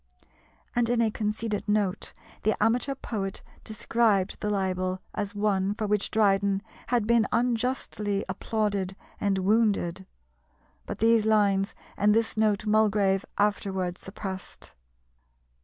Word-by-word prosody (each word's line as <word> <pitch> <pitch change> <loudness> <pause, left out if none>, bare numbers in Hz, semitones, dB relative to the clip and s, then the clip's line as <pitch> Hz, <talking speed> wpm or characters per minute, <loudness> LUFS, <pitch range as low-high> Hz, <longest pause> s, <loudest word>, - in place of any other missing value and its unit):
And, 240 -1 +2
in 240 -1 +2
a 225 -2 +3
conceited 210 0 -2
note, 205 -2 0 0.3
the 215 - +2
amateur 245 +5 +1
poet 200 -7 -4 0.2
described 215 -3 +1
the 210 - -1
libel 185 -2 -1
as 205 +1 -3
one 205 -1 +1
for 215 - -2
which 210 -1 +1
Dryden 200 -2 +2 0.2
had 240 -3 +1
been 230 -2 +3
unjustly 230 -4 0
"applauded 200 -1 -1 0.2
and 200 -1 +1
wounded." 190 -3 +1 0.8
But - - -4
these 225 -1 +3
lines 200 -2 +2 0.2
and 210 +1 +4
this 225 0 +1
note 215 -1 +1
Mulgrave 210 -2 +2
afterwards 190 -3 0
suppressed. 190 -1 -7
210 Hz, 120 wpm, -27 LUFS, 195-220 Hz, 0.8 s, and